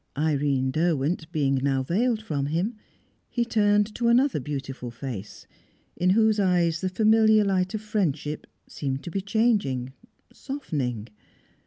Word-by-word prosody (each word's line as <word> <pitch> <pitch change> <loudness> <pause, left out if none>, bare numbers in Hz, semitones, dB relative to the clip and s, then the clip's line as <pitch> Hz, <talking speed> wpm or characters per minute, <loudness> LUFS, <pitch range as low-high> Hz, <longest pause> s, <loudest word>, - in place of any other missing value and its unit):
Irene 140 -3 +1
Derwent 160 +1 0
being 140 -4 +1
now 135 -1 +1
veiled 220 - 0
from 145 -8 -2
him, 175 +10 -1 0.6
he 240 -1 0
turned 210 -2 +2
to 235 +1 -1
another 245 - +3
beautiful 135 -2 -5
face, 115 -4 -7 0.5
in 180 - +1
whose 220 +2 +3
eyes 175 -4 +2
the 185 - 0
familiar 220 +2 +4
light 185 +1 0
of 215 - -3
friendship 160 - -2 0.2
seemed 135 -2 -4
to 175 - -6
be 195 - -2
changing, 200 - 0 0.4
softening. 140 - -4
170 Hz, 135 wpm, -25 LUFS, 140-215 Hz, 0.6 s, familiar